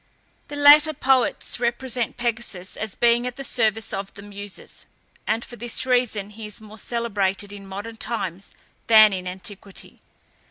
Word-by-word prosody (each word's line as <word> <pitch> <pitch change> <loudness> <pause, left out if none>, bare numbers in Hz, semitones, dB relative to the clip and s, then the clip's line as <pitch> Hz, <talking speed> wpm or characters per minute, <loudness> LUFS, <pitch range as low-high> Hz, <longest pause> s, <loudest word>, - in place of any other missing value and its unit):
The 290 - -7
later 295 +2 +7
poets 260 -3 +1
represent 240 0 -1
Pegasus 225 -6 -3
as 220 -3 -4
being 240 +1 +3
at 250 - -5
the 275 - -7
service 225 -4 0
of 195 0 -4
the 200 - -10
Muses, 205 -1 -8 0.4
and 225 +2 0
for 240 - -10
this 240 +2 -1
reason 245 -5 +1
he 215 0 -8
is 210 - -7
more 215 0 -11
celebrated 205 -4 -1
in 200 -1 -10
modern 205 +4 -7
times 195 -6 -3 0.4
than 215 -2 +8
in 185 -1 -4
antiquity. 190 +2 -7
220 Hz, 155 wpm, -23 LUFS, 200-240 Hz, 0.4 s, than